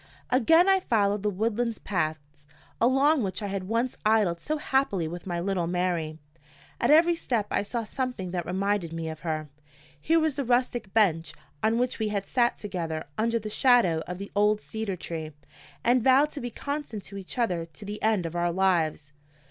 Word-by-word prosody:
Again 325 - +5
I 385 0 +5
followed 205 - +1
the 210 - +1
woodland 225 +3 -1
paths 155 -5 -3 0.3
along 270 +5 +4
which 195 0 -3
I - - -1
had 195 -1 -3
once 230 +4 -1
idled 210 -6 +2
so 310 +1 -2
happily 265 - 0
with 175 +3 -7
my 175 -1 -2
little 180 -1 -1
Mary. 175 -3 -1 0.6
At - - +1
every 330 +3 +6
step 240 -10 -1
I - - +2
saw 230 +3 -3
something 235 -5 -4
that 175 -2 -3
reminded 190 -2 -1
me 165 -1 -4
of 160 -1 -7
her. 155 -2 -3 0.5
Here 330 +1 +3
was 315 -4 0
the 280 - 0
rustic 240 -4 0
bench 165 -7 +2 0.3
on 220 +1 +2
which 250 0 0
we 220 - 0
had 200 -2 -2
sat 240 +1 +1
together 165 -6 -4
under 230 +1 +1
the 215 -1 -5
shadow 225 -11 +4
of 180 0 -5
the 200 +1 -8
old 210 +1 +3
cedar 220 -3 -4
tree, 160 -3 -6 0.5
and 240 0 +3
vowed 270 +4 +5
to 290 - -6
be 245 - -3
constant 280 -5 -5
to 200 - -9
each 190 +6 -9
other 180 -9 0
to 185 +5 -13
the 210 +1 -6
end 215 -5 +2
of 165 +1 -5
our 175 0 +1
lives. 170 -5 0
205 Hz, 190 wpm, -27 LUFS, 175-240 Hz, 0.6 s, every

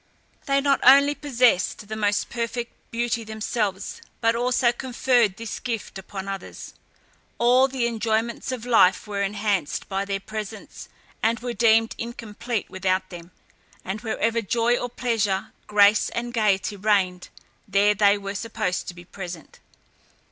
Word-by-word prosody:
They 275 0 +3
not 275 -1 +2
only 280 +3 +7
possessed 245 -8 +1
the 215 - -5
most 205 -1 0
perfect 235 0 -3 0.2
beauty 235 0 -1
themselves, 215 -2 -3 0.2
but 230 0 +2
also 245 0 +2
conferred 245 -4 +1
this 230 -1 -6
gift 225 -5 -4
upon 190 0 -7
others. 195 -1 -7 0.6
All 250 +3 +5
the 260 -3 -1
enjoyments 230 +1 -1
of 245 -2 -5
life 205 -6 +4
were 205 -1 -3
enhanced 200 -5 -1
by 195 0 -2
their 195 0 -2
presence, 215 +1 -8 0.3
and 230 +1 +1
were 245 0 -3
deemed 225 0 +3
incomplete 230 -1 -4
without 185 0 -1
them; 170 -1 -10 0.6
and 195 +3 -4
wherever 230 0 0
joy 230 +3 +1
or 245 - -3
pleasure, 220 -6 -1 0.2
grace 205 0 +5
and 240 0 -4
gaiety 210 -2 +1
reigned, 190 -3 +1 0.4
there 200 +1 +3
they 205 0 +4
were 200 0 -5
supposed 200 -4 -3
to 175 - -6
be 175 0 -12
present. 175 -4 -9
220 Hz, 140 wpm, -24 LUFS, 200-235 Hz, 0.6 s, only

